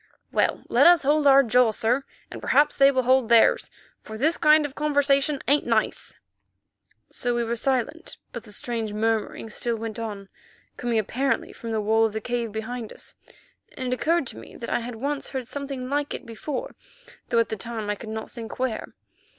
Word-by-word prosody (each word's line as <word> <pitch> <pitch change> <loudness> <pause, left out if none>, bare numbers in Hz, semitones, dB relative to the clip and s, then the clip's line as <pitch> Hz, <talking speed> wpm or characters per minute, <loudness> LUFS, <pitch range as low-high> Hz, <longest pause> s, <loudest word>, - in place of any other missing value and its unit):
"Well, - - +1
let - - +5
us 345 -3 +6
hold 295 +1 +3
our 275 0 +7
jaw, 245 0 +4
sir, 240 +5 0 0.3
and - - -8
perhaps 290 +3 +3
they 275 0 +6
will 260 -2 +1
hold 255 -1 +3
theirs, 230 -1 +5 0.3
for 220 - -8
this 310 +8 +2
kind 305 -1 +5
of 285 - -5
conversation 285 -1 +1
ain't 285 0 +3
nice." 225 -2 -1 1.0
So 245 -1 -1
we 240 - +1
were 235 +1 -2
silent, 265 +7 -1
but 235 - -7
the 215 - -11
strange 225 0 -3
murmuring 220 0 -1
still 235 +2 -1
went 225 0 -5
on, 205 -3 -6 0.5
coming 240 -2 -1
apparently 255 +6 -1
from 230 - -8
the 220 -1 0
wall 220 +2 +3
of 215 - -9
the 220 - -2
cave 240 -1 -2
behind 220 +1 -5
us, - - -8 0.6
and 255 -1 -2
it - - +2
occurred 330 +3 +1
to - - -4
me - - -13
that 235 - -6
I - - +1
had 240 0 -6
once 280 +5 -3
heard 260 -3 -5
something 275 -2 -5
like 290 +1 -1
it - - -9
before, 290 - -5 0.6
though - - +1
at 230 - +3
the - - -2
time 225 0 -4
I 210 - +1
could 215 +2 -9
not 220 0 -6
think 230 -2 -8
where. 255 -3 -3
245 Hz, 200 wpm, -25 LUFS, 225-275 Hz, 1.0 s, our